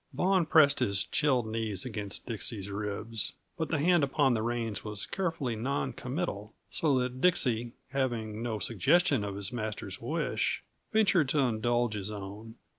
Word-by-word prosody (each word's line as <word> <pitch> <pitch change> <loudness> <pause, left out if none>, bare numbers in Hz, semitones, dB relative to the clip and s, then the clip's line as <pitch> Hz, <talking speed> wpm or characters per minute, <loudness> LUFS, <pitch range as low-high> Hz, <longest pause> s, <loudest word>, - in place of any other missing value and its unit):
Vaughan 185 -3 +2
pressed 155 -4 +6
his 100 -6 +2
chilled 130 -6 +2
knees 110 -3 -2
against 105 -5 -5
Dixie's 105 -3 -4
ribs, 105 +2 -3 0.2
but 160 - -2
the 160 - +1
hand 170 +2 +4
upon 135 -1 +3
the 110 - 0
reins 115 -2 -2
was 105 -2 -4
carefully 165 -10 -2
non 135 +6 -1
committal; 125 - -4 0.2
so 145 -5 +2
that 125 0 -2
Dixie, 120 -9 +2 0.2
having 115 -6 -1
no 115 -2 -2
suggestion 135 - +3
of 100 -1 -4
his 100 +4 -4
master's 110 -3 -4
wish, - - -1 0.3
ventured 195 -9 +4
to 150 - +2
indulge 120 -1 +1
his 105 -1 -3
own. 105 +2 -7
120 Hz, 155 wpm, -30 LUFS, 105-140 Hz, 0.3 s, pressed